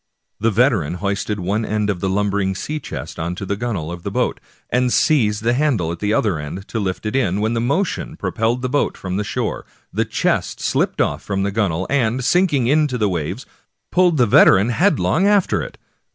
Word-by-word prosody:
The 115 - +2
veteran 110 - +2
hoisted 100 +2 -2
one 100 +5 -1
end 105 -1 -1
of 90 - -5
the 95 - -1
lum 100 +1 0
bering 95 -1 0
sea 150 +10 -4
chest - - -7
on 85 +2 -2
the 100 +1 -3
gunwale 100 -8 -3
of 85 0 -7
the - - -4
boat, - - -1 0.3
and 125 0 +2
seized 110 -11 +2
the 120 +1 +2
handle 125 - +1
at 85 - -6
the 105 0 -1
other 105 -7 +1
end 85 +7 -7
to 115 - -2
lift 95 0 -3
it 105 - -2
in, 100 -8 +1
when 110 +2 0
the 115 - 0
motion 165 +10 -1
propelled 115 +3 -1
the - - +1
boat 145 +3 0
from 95 0 -4
the 105 - 0
shore, - - -3 0.3
the - - +1
chest - - -1
slipped - - 0
off - - 0
from 95 -1 -2
the 100 - -1
gun 105 -1 +1
wale, 85 +3 -2
and, 125 -2 0
sinking 165 -6 +2
into 145 0 +2
the 105 -3 +1
waves, 90 - -3 0.5
pulled 180 -3 +3
the 125 - +5
veteran 100 0 +5
head 175 - +2
long 185 +6 +2
after 205 -2 +2
it. - - -8
110 Hz, 215 wpm, -20 LUFS, 95-125 Hz, 0.5 s, the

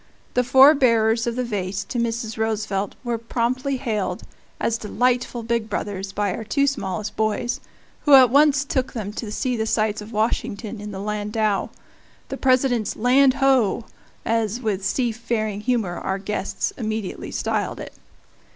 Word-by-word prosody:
The 250 - +2
four 265 +4 +7
bearers 230 -4 +3
of 235 - -1
the 250 - -1
vase 195 -4 -3
to 245 - -4
Mrs. 230 -1 -2
Roosevelt 215 -3 -2
were 240 -2 -2
promptly 255 +4 -1
hailed 220 -6 -2 0.4
as 230 0 0
delightful 245 +2 0
big 230 -1 -1
brothers 200 -1 -3
by 205 -1 -1
our 230 - -5
two 280 +6 +1
smallest 215 -6 -3
boys, 220 +4 -1 0.5
who 290 -2 +8
at 255 -3 +7
once 290 0 +4
took 260 -2 -1
them 210 -3 -4
to 215 -1 -5
see 250 +3 -1
the 220 -1 -1
sights 215 -1 0
of 210 +2 -10
Washington 220 0 -2
in 210 - -6
the 195 -2 -6
landau 210 0 -1 0.6
"the 270 - -4
President's 255 -4 +2
land 260 +3 +4
ho!" 250 -5 +2 0.4
as, 225 0 0
with 210 -5 -2
seafaring 225 -2 -1
humor, 220 -7 -1
our 190 - -2
guests 200 0 -3
immediately 215 -4 -4
styled - - -2
it. - - -8
225 Hz, 155 wpm, -23 LUFS, 210-250 Hz, 0.6 s, who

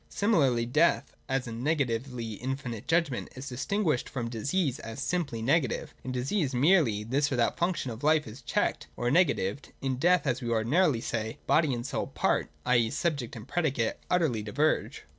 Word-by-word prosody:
Similarly 140 - +2
death, 120 - +2
as 130 -1 0
a 120 - -6
negatively 125 -3 -1
infinite 125 -1 -5
judgment, 165 -6 +1
is 130 +1 -7
distinguished 150 +3 -1
from 115 -3 -4
disease 135 - -1
as 115 +3 -7
simply 140 -7 -2
negative. 140 +1 +1
In 130 - -4
disease, 130 +3 -1
merely 135 - +3
this 140 +6 0
or - - +1
that 120 -1 +1
function 170 -7 0
of 115 +3 -9
life 155 0 +4
is 120 +3 -10
checked 120 - -1
or 120 0 0
negatived: 140 - +1
in 130 -2 -2
death, 175 +5 +3
as 125 -4 0
we 120 - -3
ordinarily 120 +4 +2
say, 110 -1 -3
body 155 -2 +3
and 120 -1 -3
soul - - -2
part, - - 0 0.2
i. 125 0 +4
e. 115 -1 +2
subject 140 -2 -2
and 115 +1 -9
predicate 140 -10 0
utterly 160 -11 +2
diverge. 145 +9 0
130 Hz, 175 wpm, -29 LUFS, 115-155 Hz, 0.2 s, life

